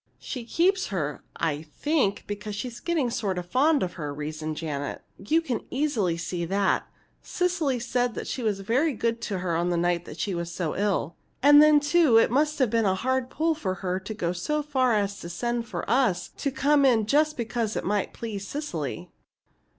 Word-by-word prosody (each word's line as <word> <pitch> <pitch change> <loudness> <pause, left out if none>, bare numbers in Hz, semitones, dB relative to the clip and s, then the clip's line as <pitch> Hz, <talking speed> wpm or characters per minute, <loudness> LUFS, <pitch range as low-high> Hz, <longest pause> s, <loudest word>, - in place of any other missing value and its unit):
"She 250 -4 -6
keeps 375 - +2
her, 150 -7 -3
I 150 -2 -1
think, 200 - 0
because 205 0 -5
she's 240 +2 -5
getting 315 -7 0
sort 200 -5 -1
of 180 - -3
fond 280 - +3
of 180 - -3
her," 150 -4 -5
reasoned 155 +1 -5
Janet. 145 -3 -4 0.2
"You 310 +12 +2
can 250 -9 -3
easily 240 - 0
see 170 +1 -3
that. 195 +3 +1 0.3
Cecily 345 -7 0
said 245 0 -1
she 260 - -4
was 210 -4 -1
very 260 +10 +1
good 230 0 -1
to 205 -4 -2
her 170 -2 -1
the 175 0 0
night 175 0 -1
she 200 - -1
was 170 -1 -3
so 170 -3 -2
ill. 195 -4 -1 0.3
And 290 +1 +9
then, 305 -1 +7
too, 290 -4 +4
it 225 - +4
must 300 +4 +2
have 255 -6 +2
been 230 -1 +2
a 190 -1 +3
hard 260 +4 -1
pull 320 +4 +1
for 195 -12 -3
her 185 0 -2
to 200 +3 -6
go 175 -5 -1
so 300 +12 -1
far 260 -5 +2
as 200 -1 -1
to 170 - -7
send 235 +6 -2
for - - -5
us 225 -7 +2
to 280 - -3
come 280 +2 +3
in 235 -5 +4
just 305 +6 +2
because 230 -2 -2
it - - -2
might 205 0 0
please 210 -4 -6
Cecily." 175 - -4
225 Hz, 195 wpm, -26 LUFS, 180-275 Hz, 0.3 s, And